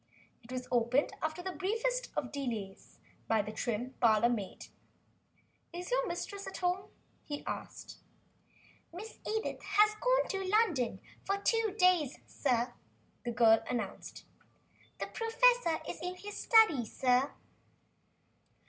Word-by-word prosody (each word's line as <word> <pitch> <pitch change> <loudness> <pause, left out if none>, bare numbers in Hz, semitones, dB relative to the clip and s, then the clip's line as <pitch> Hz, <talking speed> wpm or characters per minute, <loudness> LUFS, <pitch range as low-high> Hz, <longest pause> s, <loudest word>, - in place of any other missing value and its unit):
It 235 - -13
was 255 -1 -4
opened 245 +3 +2
after 315 +3 -3
the 375 - -3
briefest 455 +7 -1
of 250 - -2
delays 225 -9 -5 0.3
by 220 -2 +2
the 210 - -6
trim 240 +3 -3
parlor 230 0 +5
maid. 210 -6 -4 1.1
"Is 355 +5 -6
your - - +2
mistress 395 +3 -5
at - - -6
home?" 360 +1 -1 0.3
he 290 -1 -6
asked. - - -6 0.9
"Miss 410 +6 -9
Edith 440 0 -2
has 420 +2 +4
gone - - +2
to 390 -1 -2
London 370 - +1 0.2
for 395 +1 0
two 440 0 +1
days, 360 - +3
sir," 245 -3 0 0.5
the 240 - -1
girl 225 -1 +5
announced. 225 -6 -4 0.7
"The - - -3
professor 455 -6 +3
is - - -5
in 360 +1 -3
his 410 +2 -8
study, 435 - +5
sir." 250 +4 +1
340 Hz, 130 wpm, -32 LUFS, -, 1.1 s, parlor